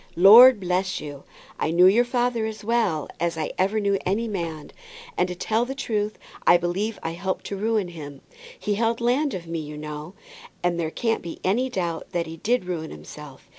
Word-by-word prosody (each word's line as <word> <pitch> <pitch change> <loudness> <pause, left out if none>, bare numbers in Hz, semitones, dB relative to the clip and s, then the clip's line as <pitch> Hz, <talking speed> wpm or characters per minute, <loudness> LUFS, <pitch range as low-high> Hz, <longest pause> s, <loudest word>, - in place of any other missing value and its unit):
Lord 225 +7 +9
bless 185 +1 -1
you, 145 -2 -9 0.3
I - - 0
knew 175 +3 +5
your 210 +6 +6
father 240 -2 0
as 215 -2 -7
well 210 -10 0
as 170 -1 -1
I 155 - -2
ever 200 +4 +2
knew 200 -1 +1
any 210 +5 0
man; 170 -7 -5 0.4
and - - +1
to 180 - -5
tell 220 +6 0
the 265 +2 -5
truth, 215 -6 -2 0.3
I 175 - +8
believe 190 +6 -2
I 165 - -2
helped 185 +3 -4
to 200 - -4
ruin 210 -2 0
him. 145 -5 -9 0.4
He 210 - -1
held 230 +2 0
land 250 +3 +1
of 175 -2 -6
me, 165 0 -4
you 150 -1 -7
know, 150 +4 -7 0.5
and 175 -1 0
there 160 -2 -1
can't 225 +7 -1
be 170 - -8
any 240 +8 +1
doubt 170 -7 -4
that 170 -1 0
he 165 0 -8
did 240 +4 0
ruin 170 -3 -4
himself. 150 -3 -11
190 Hz, 200 wpm, -24 LUFS, 165-225 Hz, 0.5 s, Lord